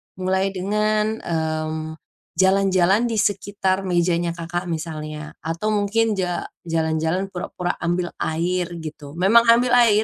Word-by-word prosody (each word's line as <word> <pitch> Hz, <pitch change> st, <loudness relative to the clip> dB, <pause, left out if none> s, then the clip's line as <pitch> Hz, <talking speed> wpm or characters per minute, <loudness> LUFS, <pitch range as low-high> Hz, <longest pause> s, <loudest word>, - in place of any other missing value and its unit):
mulai 190 Hz, +1 st, 0 dB
dengan, 215 Hz, +3 st, 0 dB
mmm, 160 Hz, -1 st, -3 dB, 0.4 s
jalan-jalan 190 Hz, +2 st, +3 dB
di 230 Hz, -, -2 dB
sekitar 195 Hz, -2 st, 0 dB
mejanya 175 Hz, -1 st, +1 dB
Kakak 175 Hz, +1 st, -4 dB
misalnya. 155 Hz, -2 st, -5 dB
Atau 165 Hz, +7 st, -2 dB
mungkin 210 Hz, +1 st, +1 dB
ja 180 Hz, -1 st, -1 dB, 0.2 s
jalan-jalan 160 Hz, +4 st, 0 dB
pura-pura 180 Hz, 0 st, -3 dB
ambil 175 Hz, +1 st, -1 dB
air, 175 Hz, +2 st, 0 dB, 0.2 s
gitu. 150 Hz, -2 st, -8 dB
Memang 215 Hz, +7 st, +5 dB
ambil 235 Hz, +1 st, +5 dB
air 230 Hz, -4 st, +5 dB
185 Hz, 120 wpm, -22 LUFS, 165-205 Hz, 0.4 s, Memang